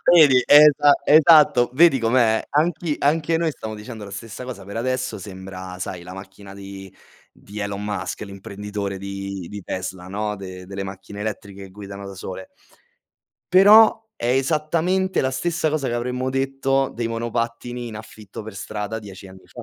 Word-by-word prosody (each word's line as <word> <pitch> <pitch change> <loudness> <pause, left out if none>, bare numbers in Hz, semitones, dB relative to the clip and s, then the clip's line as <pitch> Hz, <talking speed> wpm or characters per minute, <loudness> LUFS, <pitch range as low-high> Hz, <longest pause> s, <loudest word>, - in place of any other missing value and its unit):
Vedi, 140 -7 +7
è 145 +1 +9
esa 145 0 +4
esatto, 150 -5 +6
vedi 165 -2 +5
com'è? 115 -1 +2
Anch'i 160 +1 0
anche 160 +3 +1
noi 165 -1 0
stiamo 110 -6 -7
dicendo 110 0 -9
la 100 - -10
stessa 110 +5 -8
cosa 120 -7 -8
per 100 +2 -8
adesso, 130 -1 -2
sembra 95 -1 -9
sai, 90 -1 -5
la 90 +1 -10
macchina 95 +1 -11
di 95 -1 -10 0.4
di 105 +2 -10
Elon 100 0 -4
Musk, 105 -3 -4
l'imprenditore 100 0 -6
di 100 -1 -6
di 105 -1 -7
Tesla, 95 0 -5
no, 105 +2 -3
de 95 -1 -9
delle 100 +1 -5
macchine 95 +1 -9
elettriche 100 -2 -6
che 95 - -13
guidano 100 0 -9
da 100 - -8
sole. 95 0 -8 1.1
Però, 215 +4 +7
è - - -4
esattamente 160 +8 +1
la 130 - 0
stessa 170 +4 -1
cosa, 150 -3 -1
che 120 - -2
avremmo 125 +2 -2
detto 135 0 0
dei 115 -1 -2
monopattini 115 +1 -3
in 110 -2 -7
affitto 110 -1 -10
per 105 -1 -9
strada 105 +2 -5
10 100 -2 -11
anni 95 0 -16
fa. - - -11
110 Hz, 170 wpm, -22 LUFS, 100-135 Hz, 1.1 s, è